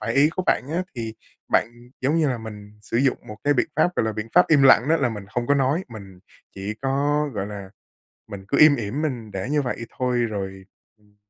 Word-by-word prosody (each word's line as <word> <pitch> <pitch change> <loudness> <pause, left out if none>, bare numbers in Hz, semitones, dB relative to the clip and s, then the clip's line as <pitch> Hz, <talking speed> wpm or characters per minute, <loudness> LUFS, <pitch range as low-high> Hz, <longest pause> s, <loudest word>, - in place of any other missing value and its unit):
phải 115 +2 -2
ý 140 +2 +5
của 185 +2 -3
bạn - - +3
á, 180 +2 0
thì 115 -2 -5 0.4
bạn, - - +3 0.3
giống 140 +5 +1
như 155 -3 +2
là, 125 - -2
mình 105 -2 -9
sử 115 - -3
dụng 130 +1 +2
một 105 - -8
cái 145 0 +3
biện 130 - +2
pháp, 180 - +2
gọi - - +2
là, 110 - -1
biện 110 +2 -5
pháp 180 - +6
im 145 -3 +5
lặng, 130 -1 +6
đó 165 - +4
là 130 -5 +1
mình 105 -4 -7
không 120 +3 -3
có 145 - +3
nói, 140 +6 +1
mình 100 -5 -11 0.4
chỉ 100 +2 -5
có, 145 +2 +1
gọi 100 -1 -2
là, 100 -2 -8 0.6
mình 95 -1 -9
cứ - - 0
im 150 -1 +8
ỉm 120 +4 -3
mình 120 -8 -3
để 95 +7 -4
như 150 0 +2
vậy 125 -2 -4
thôi. 125 -1 0
Rồi, 95 -4 -3 0.3
ừm, 105 -1 -29
120 Hz, 240 wpm, -23 LUFS, 105-145 Hz, 0.6 s, im